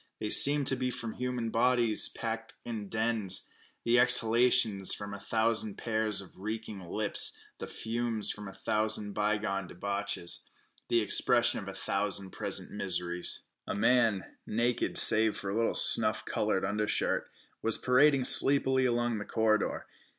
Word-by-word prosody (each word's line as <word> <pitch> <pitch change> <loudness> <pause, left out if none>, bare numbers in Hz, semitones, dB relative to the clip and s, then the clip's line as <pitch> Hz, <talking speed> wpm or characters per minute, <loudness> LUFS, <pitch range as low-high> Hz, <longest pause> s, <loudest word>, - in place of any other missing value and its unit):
They 105 - -4
seemed 145 0 +4
to 130 - 0
be 130 0 -2
from 115 -3 -6
human 125 -2 -4
bodies 120 -1 +1
closely - - -11
packed - - -5
in 110 -4 -6
dens; 110 -4 -2 0.4
the 120 +1 +3
exhalations 115 -4 +2
from 100 0 -8
a 100 - -7
hundred 110 0 -1
pairs 110 -3 -1
of 95 -1 -14
reeking 110 0 -6
lips; 100 +4 -3 0.2
the - - -6
fumes 115 -1 -3
from 105 -1 -8
a - - -8
thousand 105 +1 -2
bygone 105 -2 -2
debauches; 100 -1 -5 0.4
the 120 -1 +2
expression 120 +3 +2
of 100 - -9
a 95 - -7
thousand 100 -1 -3
present - - -5
miseries. 90 -3 -3 0.2
A - - -3
man, 115 -3 +1
naked 120 +2 -1
save 110 -1 +8
for 100 - -5
a - - -3
little 115 0 0
snuff - - +5
colored - - -1
undershirt, 105 +1 -1 0.3
was 115 0 +4
parading 135 +1 +3
sleepily 130 -1 +3
along 120 -2 -1
the - - -5
corridor. 110 -1 0
110 Hz, 150 wpm, -30 LUFS, 100-120 Hz, 0.4 s, save